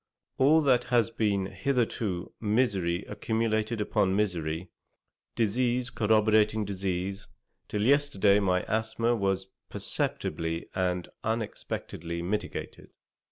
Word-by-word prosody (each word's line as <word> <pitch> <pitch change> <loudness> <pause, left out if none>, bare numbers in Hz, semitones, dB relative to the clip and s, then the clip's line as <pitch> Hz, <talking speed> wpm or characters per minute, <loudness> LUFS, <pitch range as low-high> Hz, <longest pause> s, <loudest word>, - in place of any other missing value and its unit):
All 155 +4 +5
has 125 -4 +3
been 105 -4 +1
hitherto 100 -2 -1
misery 100 -6 +1
accumulated 110 +1 -1
upon 100 -2 +1
misery, 90 -4 -1 0.6
disease 120 +2 +1
corroborating 110 -1 +3
disease, 95 0 -3 0.4
till 105 0 -1
yesterday 115 -7 +4
my 90 -2 +1
asthma 110 +2 0
was 95 -3 0 0.2
perceptibly 80 +1 -2
and 90 -2 -1 0.2
unexpectedly 85 -6 -3
mitigated. 105 +4 -4
105 Hz, 90 wpm, -28 LUFS, 95-115 Hz, 0.6 s, All